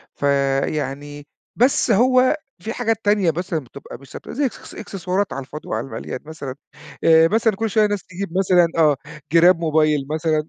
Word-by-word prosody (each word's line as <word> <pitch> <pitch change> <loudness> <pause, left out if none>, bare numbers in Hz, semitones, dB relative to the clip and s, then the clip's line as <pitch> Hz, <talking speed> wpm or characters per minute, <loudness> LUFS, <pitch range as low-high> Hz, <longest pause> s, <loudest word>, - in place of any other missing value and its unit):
فيعني 140 +1 -1 0.3
بس 250 0 +2
هو 255 +6 +4 0.3
في 225 +5 -4
حاجات 225 -2 0
تانية 205 -5 +3
مثلًا 175 0 -3
بتبقى 140 +1 -11
مش 140 -1 -17
ثابتة - - -9
تبقى - - -8
زي 285 0 +1
إكس 250 - -7
إكسسوارات 195 -2 -3
على 135 - -4
الفاضي 150 +2 -10
وعلى 110 +4 -3
المليان 115 +2 -6
مثلًا 140 -4 -7 0.5
آآ 160 0 +6
مثلًا 220 +1 +1
كل 225 +2 -2
شوية 215 0 +3
ناس 205 -2 -3
تجيب 185 0 -5
مثلًا 180 -3 +4
آه 150 -3 +4 0.3
جِراب 170 +1 +5
موبايل 155 -3 +1
مثلًا 155 0 0
165 Hz, 170 wpm, -21 LUFS, 145-205 Hz, 0.5 s, آآ